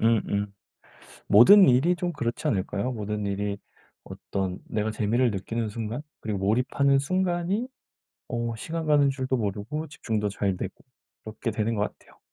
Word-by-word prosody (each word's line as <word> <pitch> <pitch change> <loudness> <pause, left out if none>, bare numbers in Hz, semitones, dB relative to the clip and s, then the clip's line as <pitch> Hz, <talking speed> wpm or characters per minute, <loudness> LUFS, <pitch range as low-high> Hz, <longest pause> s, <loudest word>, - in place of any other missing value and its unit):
음음 105 -3 +1 0.8
모든 190 - +8
일이 135 +8 +4
좀 175 0 -2
그렇지 120 -6 -3
않을까요? 100 +4 -1
모든 105 -2 -3
일이 100 0 -2 0.5
어떤 95 -2 -4
내가 110 0 -2
재미를 115 +3 +1
느끼는 110 +3 -3
순간, 115 +5 -4 0.2
그리고 105 -2 -3
몰입하는 125 +7 +2
순간이 185 - 0 0.6
어 120 -1 -2
시간 165 +7 -4
가는 145 -2 +4
줄도 130 -1 -1
모르고 110 +8 -3
집중도 110 -7 -2
잘 100 -1 -1
되고 - - -5 0.5
이렇게 110 +2 -4
되는 110 +1 -1
것 105 - 0
같아요. - - -7
115 Hz, 315 characters per minute, -26 LUFS, 105-140 Hz, 0.8 s, 모든